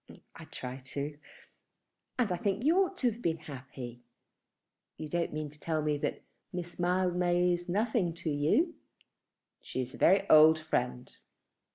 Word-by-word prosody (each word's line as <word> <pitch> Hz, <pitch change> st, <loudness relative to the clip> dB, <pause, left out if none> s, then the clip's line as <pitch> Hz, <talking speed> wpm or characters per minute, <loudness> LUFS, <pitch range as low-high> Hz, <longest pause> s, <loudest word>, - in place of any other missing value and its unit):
"I -, -, -10 dB
try 125 Hz, 0 st, -7 dB
to; 140 Hz, +3 st, -5 dB, 1.0 s
and 240 Hz, -6 st, +1 dB
I -, -, +1 dB
think 200 Hz, +4 st, -1 dB
you 315 Hz, +5 st, +4 dB
ought 375 Hz, 0 st, -5 dB
to 250 Hz, -8 st, +2 dB
have 230 Hz, +2 st, -10 dB
been 165 Hz, -5 st, 0 dB
happy. 130 Hz, -5 st, -9 dB, 1.0 s
You 155 Hz, -, -5 dB
don't 170 Hz, +1 st, -1 dB
mean 150 Hz, -1 st, -4 dB
to 150 Hz, -, -16 dB
tell 155 Hz, -1 st, -1 dB
me 150 Hz, -1 st, 0 dB
that -, -, -3 dB, 0.3 s
Miss 175 Hz, -1 st, -6 dB
Mildmay 180 Hz, 0 st, +2 dB
is 175 Hz, +1 st, -4 dB
nothing 205 Hz, -3 st, +1 dB
to 165 Hz, -2 st, -3 dB
you?" 160 Hz, -, +2 dB, 0.9 s
"She -, -, -5 dB
is 130 Hz, +2 st, -9 dB
a -, -, -11 dB
very 195 Hz, +2 st, +4 dB
old 155 Hz, +1 st, +8 dB
friend." 125 Hz, -5 st, -2 dB
170 Hz, 160 wpm, -31 LUFS, 145-185 Hz, 1.0 s, old